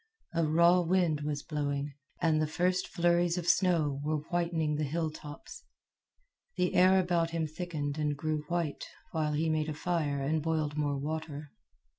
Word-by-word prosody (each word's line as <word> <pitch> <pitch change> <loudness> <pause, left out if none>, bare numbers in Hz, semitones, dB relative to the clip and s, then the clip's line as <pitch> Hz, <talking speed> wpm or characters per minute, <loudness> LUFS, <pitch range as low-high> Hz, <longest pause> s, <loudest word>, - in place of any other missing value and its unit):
A 165 0 +1
raw 170 +3 +5
wind 170 -3 +1
was 145 -1 -3
blowing, 145 -2 -2 0.3
and 155 -2 +3
the 155 - +1
first 180 +3 0
flurries 175 -1 +2
of 175 -1 -3
snow 160 -8 +2
were 155 +1 0
whitening 170 -3 0
the 150 +1 -1
hilltops. 155 -1 -5 0.9
The 180 - 0
air 185 +1 +6
about 175 -2 +1
him 165 -1 -1
thickened 155 -2 -4
and 150 -1 0
grew 155 0 -1
white 170 -3 -2 0.3
while 155 -2 0
he 160 +2 0
made 155 0 0
a 155 - -3
fire 155 -4 -1
and 155 +3 0
boiled 155 -2 -1
more 145 -2 0
water. 150 0 -5
155 Hz, 160 wpm, -31 LUFS, 150-170 Hz, 0.9 s, air